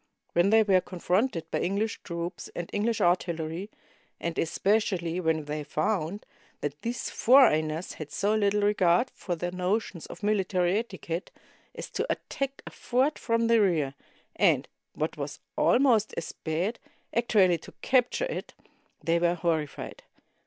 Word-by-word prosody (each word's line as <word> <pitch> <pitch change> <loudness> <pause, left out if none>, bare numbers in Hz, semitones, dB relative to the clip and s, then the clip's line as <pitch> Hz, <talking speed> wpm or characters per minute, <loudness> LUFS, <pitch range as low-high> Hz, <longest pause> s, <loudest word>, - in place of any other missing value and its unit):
When 175 +3 +4
they 220 +1 +6
were 190 -3 +4
con 180 - -9
fronted 185 0 +1
by - - 0
English 205 +4 -1
troops 170 +1 -5
and 175 -1 -5
English 220 +2 0
artillery, 175 +1 0 0.5
and 170 -1 -3
especially 180 -1 +1
when 160 -3 0
they 150 +1 -3
found 195 +3 -1 0.4
that 145 0 -4
these 235 +1 -3
foreigners 170 - +4
had 155 -2 -7
so 205 +2 +1
little 205 -1 +2
regard 205 +2 +3
for 175 - -4
their 175 +1 -3
notions 185 0 -2
of - - -11
military 190 -2 +2
etiquette 190 -5 -5 0.5
as - - -7
to - - -1
attack 275 -1 -4
a - - -8
fort 260 +5 0
from 230 0 +1
the 230 -1 +4
rear, 160 -9 +2 0.4
and, - - +3 0.3
what - - -3
was - - -5 0.2
almost 240 -5 +3
as 165 - -3
bad, 175 +8 -2 0.4
actually 195 -7 +4
to - - -12
capture 255 - +2
it, - - -5 0.5
they 170 +1 +2
were 175 0 +2
horrified. 165 -4 -2
185 Hz, 145 wpm, -28 LUFS, 170-220 Hz, 0.5 s, they